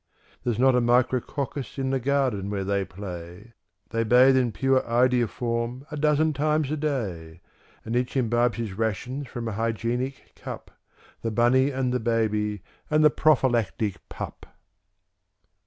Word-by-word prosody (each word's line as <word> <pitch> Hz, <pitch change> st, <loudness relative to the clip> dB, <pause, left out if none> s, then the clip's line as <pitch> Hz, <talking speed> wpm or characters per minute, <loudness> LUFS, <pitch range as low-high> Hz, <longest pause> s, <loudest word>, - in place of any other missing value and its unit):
There's 120 Hz, -3 st, -1 dB
not 130 Hz, +2 st, +4 dB
a 125 Hz, -, +3 dB
Micrococcus 125 Hz, +3 st, 0 dB
in 135 Hz, -1 st, -1 dB
the 135 Hz, -, +1 dB
garden 130 Hz, -7 st, 0 dB
where 100 Hz, -1 st, -2 dB
they 100 Hz, 0 st, 0 dB
play; 95 Hz, +2 st, -9 dB, 0.4 s
They 115 Hz, 0 st, 0 dB
bathe 125 Hz, +4 st, +6 dB
in 125 Hz, -3 st, +2 dB
pure 135 Hz, +2 st, +2 dB
iodoform 120 Hz, +1 st, 0 dB
a -, -, -4 dB
dozen 150 Hz, +1 st, +2 dB
times 150 Hz, 0 st, 0 dB
a -, -, +1 dB
day; 100 Hz, -, -3 dB, 0.5 s
And 115 Hz, +2 st, -3 dB
each 125 Hz, +2 st, 0 dB
imbibes 120 Hz, -1 st, +1 dB
his 115 Hz, -4 st, -3 dB
rations 115 Hz, +6 st, -3 dB
from 120 Hz, -2 st, -5 dB
a -, -, -2 dB
Hygienic 115 Hz, +4 st, -3 dB
CupŚ -, -, -8 dB, 0.5 s
The 115 Hz, -, -1 dB
Bunny 120 Hz, +4 st, +3 dB
and 130 Hz, -2 st, -1 dB
the 125 Hz, -, +1 dB
Baby 105 Hz, -3 st, 0 dB, 0.3 s
and 155 Hz, 0 st, +3 dB
the 150 Hz, -, +7 dB
Prophylactic 120 Hz, -9 st, +1 dB
Pup. -, -, -7 dB
120 Hz, 145 wpm, -25 LUFS, 110-135 Hz, 0.5 s, the